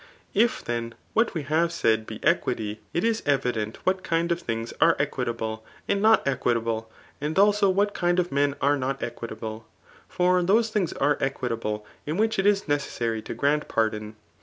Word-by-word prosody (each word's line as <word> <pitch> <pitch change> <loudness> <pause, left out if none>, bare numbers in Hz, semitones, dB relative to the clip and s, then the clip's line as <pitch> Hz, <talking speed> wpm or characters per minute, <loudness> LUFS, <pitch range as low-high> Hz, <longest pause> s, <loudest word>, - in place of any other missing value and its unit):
If 230 +4 +2
then 115 -1 -3 0.2
what 225 -3 +2
we 160 - -2
have 160 +4 +1
said 110 -9 +1
be 110 - -7
equity, 110 -10 0
it 170 - -1
is 225 -1 +1
evident 125 -6 0
whstt 185 0 +2
kind 170 0 0
of 170 +1 0
things 115 -5 -3
are - - +6
equitable 110 -1 -2 0.2
and 200 0 +1
not 220 -7 +4
equi* 125 -3 +1
table, 115 -1 -2 0.3
and 150 +2 -2
abo 205 0 +4
what 205 +2 +1
kind 175 0 +1
of 180 -1 +1
men 140 0 +1
are 145 +1 +3
not 135 0 -2
equitable. 115 -2 -6 0.4
For 180 0 +2
Aose 220 +5 +3
things 200 -7 0
are 145 +1 +1
equitable 115 -5 -2 0.2
in 155 +3 -1
which 220 -1 +1
it 195 - +3
is 205 -2 +2
necessary 120 -6 -1
to - - -6
grant 145 +5 +1
pardon. 110 -1 -1
145 Hz, 180 wpm, -26 LUFS, 115-180 Hz, 0.4 s, are